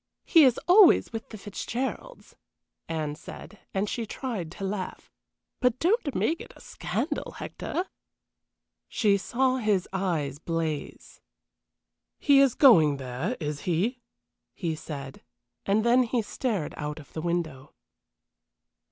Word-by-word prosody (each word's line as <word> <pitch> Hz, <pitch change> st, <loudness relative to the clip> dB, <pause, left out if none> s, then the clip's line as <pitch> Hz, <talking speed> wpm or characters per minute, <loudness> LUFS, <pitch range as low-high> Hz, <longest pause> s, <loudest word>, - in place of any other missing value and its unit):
He 325 Hz, -4 st, +7 dB
is 250 Hz, -3 st, +3 dB
always 365 Hz, -, +6 dB
with 225 Hz, -, -6 dB
the 215 Hz, -, -8 dB
Fitzgeralds," 245 Hz, -, -5 dB, 0.5 s
Anne 155 Hz, -2 st, -2 dB
said, 205 Hz, +7 st, -11 dB
and 195 Hz, +2 st, -1 dB
she 230 Hz, +1 st, -3 dB
tried 215 Hz, -10 st, -4 dB
to 195 Hz, -, -8 dB
laugh. 190 Hz, -1 st, -4 dB, 0.5 s
"But 250 Hz, -1 st, +2 dB
don't 340 Hz, -, +1 dB
make 325 Hz, -, 0 dB
a -, -, -12 dB
scandal, -, -, -3 dB
Hector." 360 Hz, -, -4 dB, 1.0 s
She 205 Hz, -3 st, +2 dB
saw 255 Hz, +6 st, +1 dB
his 210 Hz, -6 st, +1 dB
eyes 160 Hz, -8 st, -1 dB
blaze. 165 Hz, -3 st, -4 dB, 1.0 s
"He 280 Hz, -2 st, +5 dB
is 275 Hz, -3 st, +4 dB
going 160 Hz, -, +6 dB
there, 135 Hz, -, -3 dB
is 150 Hz, -2 st, -3 dB
he?" 220 Hz, +10 st, 0 dB, 0.5 s
he 170 Hz, -4 st, -2 dB
said, 140 Hz, -4 st, -7 dB, 0.5 s
and 210 Hz, +3 st, +2 dB
then 245 Hz, +2 st, +5 dB
he 240 Hz, -1 st, 0 dB
stared 210 Hz, -, -2 dB
out 150 Hz, +1 st, -4 dB
of 145 Hz, -, -15 dB
the 160 Hz, -, -4 dB
window. 160 Hz, -5 st, -3 dB
200 Hz, 125 wpm, -27 LUFS, 160-250 Hz, 1.0 s, He